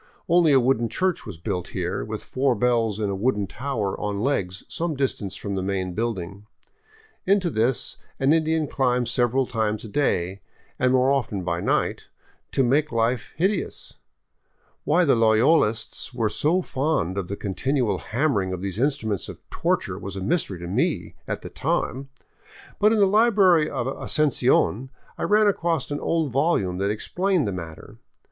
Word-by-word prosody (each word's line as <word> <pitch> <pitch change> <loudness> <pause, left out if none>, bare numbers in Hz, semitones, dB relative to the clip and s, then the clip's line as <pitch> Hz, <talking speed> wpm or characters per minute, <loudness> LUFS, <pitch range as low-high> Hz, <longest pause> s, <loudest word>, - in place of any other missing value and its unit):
Only 170 -2 +4
a 135 - +6
wooden 120 -2 +1
church 185 -8 -1
was 95 -6 -7
built 90 +1 -3
here, 90 0 -2
with 110 0 -5
four 130 -1 0
bells 115 -2 +1
in 105 -2 -1
a - - -2
wooden 105 0 0
tower 115 -3 -3
on 105 -1 -2
legs 95 -7 -1
some 165 -2 -3
distance 130 -8 -2
from 100 - -5
the 95 - -1
main 95 -1 -2
building. 100 -2 -4 0.8
Into 190 -3 +3
this 120 +2 0 0.2
an 135 +3 +4
Indian 160 -1 +1
climbs 125 -3 0
several 125 +2 +2
times 110 -2 -2
a - - -6
day, 95 -7 0 0.4
and 125 0 +3
more 130 +1 +3
often 110 -8 -1
by 85 -1 -1
night, - - 0 0.4
to 135 - +2
make 145 +5 +2
life 115 +1 -1
hideous. 190 +4 -2 0.9
Why 175 +4 +3
the 140 - +4
Loyolists 115 +1 +2
were 115 -3 +1
so 175 - +1
fond 135 - -1
of 100 -3 -3
the 100 - -4
continual 125 +4 -1
hammering 110 -7 0
of 90 - -5
these 100 +2 -4
instruments 115 - -1
of - - -11
torture - - -1
was 100 0 -6
a 95 - -5
mystery 150 - 0
to 85 - -5
me 90 - -1
at - - -4
the - - -7
time, 135 +2 -2 0.7
but 210 +1 +5
in 225 - +3
the 205 - +5
library 195 -6 +4
of 125 -3 -3
Asuncion 130 -3 +1 0.3
I - - -2
ran 210 +1 +4
across 165 -9 0
an 145 - -2
old 160 -5 0
volume 120 - +1
that 100 +1 0
explained 180 - 0
the - - -1
matter. 85 -4 -8
125 Hz, 165 wpm, -24 LUFS, 100-150 Hz, 0.9 s, a